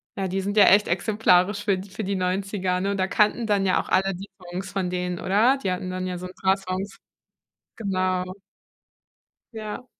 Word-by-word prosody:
na 195 -1 -2
die 190 +2 -1
sind 200 +2 -3
ja 210 - +8
echt 205 +2 +6
exemplarisch 200 +1 +2
für 200 -3 +2
d 190 +1 -8
für 205 +1 -5
die 200 - -1
90er 185 0 -1
und 200 +2 -1
da 185 - +1
kannten 210 +4 +2
dann 205 -3 +1
ja 185 - +3
auch - - -13
alle 195 0 +2
die 195 +3 -9
Songs 180 +2 -6
von 185 -2 -1
denen, 180 -1 -3
oder? 220 +8 +3
Die 190 - -1
hatten 180 0 -4
dann 185 0 -3
ja 180 -1 -3
so 180 - -7
'n 185 - -12
paar 190 0 +4
Songs. 195 0 -5 0.8
Genau. 185 -3 0 1.3
Ja. 220 +3 -6
190 Hz, 200 wpm, -24 LUFS, 185-205 Hz, 1.3 s, ja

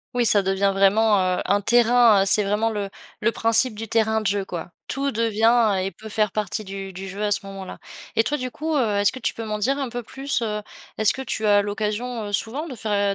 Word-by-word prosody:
Oui 245 - +2
ça 210 -2 +5
devient 195 +1 +1
vraiment, 205 +2 +3 0.2
heu, - - -2
un 200 +1 +2
terrain, 235 -2 +5
heu, - - -2
c'est 210 +2 +5
vraiment 210 +3 0
le 205 -2 -3 0.3
le 230 +2 +1
principe 230 +1 +2
du 225 +1 -6
terrain 220 0 +1
de - - -8
jeu 200 0 0
quoi. 175 -2 -7 0.2
Tout 275 0 -2
devient 225 0 +2
et 195 - -3
peut 220 +5 -11
faire 210 -1 0
partie 215 0 -2
du 195 -1 -7
du 190 +2 -7
jeu 195 +2 -7
à 210 - +1
ce 200 - -1
moment-là. 195 -1 -8 0.4
Et 225 - +4
toi 295 - -1
du 255 0 -3
coup, 315 +4 -3
heu, 225 -7 +1
est-ce 205 0 +3
que 260 - -9
tu - - -2
peux 225 - -6
m'en 210 -1 -3
dire 270 +6 +1
un 270 -3 -3
peu 245 +1 -5
plus, 270 +3 -3
heu? 210 -2 -3 0.3
Est-ce 215 0 +3
que 265 - -6
tu 220 -4 -3
as 205 -1 +5
l'occasion, 215 +3 -3
heu, - - -8
souvent 255 +10 -2
de 270 - -7
faire, 205 -3 0
215 Hz, 245 wpm, -23 LUFS, 200-235 Hz, 0.4 s, ça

